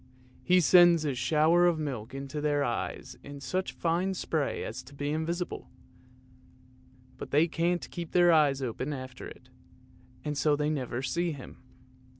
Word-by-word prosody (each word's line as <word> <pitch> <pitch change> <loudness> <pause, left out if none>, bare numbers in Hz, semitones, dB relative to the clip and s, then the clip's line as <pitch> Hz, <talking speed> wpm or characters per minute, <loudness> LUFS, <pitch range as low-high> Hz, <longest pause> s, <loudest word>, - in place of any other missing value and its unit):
he 180 0 +4
sends 175 -1 +6
a 145 - 0
shower 155 +7 +3
of 170 -2 +2
milk 130 -7 -4
into 140 +2 -5
their 145 -1 +1
eyes 120 -3 -4
in 140 0 -9
such 185 +6 -2
fine 175 +3 -1
spray 155 -5 -2
as - - -6
to 140 - -15
be 145 +1 -3
invisible; 170 +3 -3 1.5
but - - -7
they 150 +4 +3
can't 175 +2 -1
keep 170 -2 -6
their 175 -1 +5
eyes 145 -4 +3
open 130 +4 -3
after 130 -2 -8
it, 125 - -14 0.8
and 150 -2 -2
so 150 +2 +3
they 150 +1 0
never 130 -3 -3
see 170 +5 -1
him. 135 -3 -11
150 Hz, 155 wpm, -29 LUFS, 140-170 Hz, 1.5 s, sends